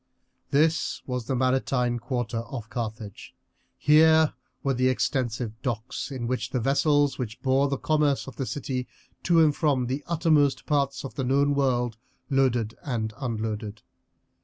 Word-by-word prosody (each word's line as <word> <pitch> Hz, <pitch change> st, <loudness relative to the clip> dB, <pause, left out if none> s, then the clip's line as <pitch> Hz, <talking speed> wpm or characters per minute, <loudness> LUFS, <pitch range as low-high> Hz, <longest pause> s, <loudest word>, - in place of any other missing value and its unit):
This 155 Hz, +3 st, +1 dB
was 125 Hz, -2 st, -3 dB
the 135 Hz, -, 0 dB
maritime 130 Hz, -1 st, +1 dB
quarter 120 Hz, -2 st, -2 dB
of 115 Hz, -1 st, -7 dB
Carthage; 110 Hz, -3 st, -6 dB, 0.4 s
here 160 Hz, +1 st, +5 dB, 0.3 s
were 135 Hz, -, +1 dB
the 130 Hz, 0 st, +2 dB
extensive 120 Hz, -3 st, -1 dB
docks 120 Hz, -2 st, -3 dB
in 130 Hz, -4 st, -4 dB
which 120 Hz, -1 st, -2 dB
the 130 Hz, -, -1 dB
vessels 140 Hz, +2 st, +2 dB
which 120 Hz, -2 st, -4 dB
bore 135 Hz, +1 st, +3 dB
the 140 Hz, 0 st, -1 dB
commerce 150 Hz, -2 st, +1 dB
of 135 Hz, -, -9 dB
the 135 Hz, -, -3 dB
city 125 Hz, +1 st, -3 dB, 0.3 s
to 170 Hz, -1 st, +3 dB
and 150 Hz, -2 st, +3 dB
from 140 Hz, -5 st, +1 dB
the 135 Hz, +4 st, -3 dB
uttermost 155 Hz, -4 st, +2 dB
parts 140 Hz, -2 st, 0 dB
of 135 Hz, -, -7 dB
the 135 Hz, -, -3 dB
known 140 Hz, +3 st, +2 dB
world 125 Hz, -5 st, 0 dB, 0.3 s
loaded 125 Hz, -5 st, +2 dB
and 110 Hz, -5 st, -2 dB
unloaded. 110 Hz, -3 st, -4 dB
130 Hz, 150 wpm, -26 LUFS, 120-140 Hz, 0.4 s, here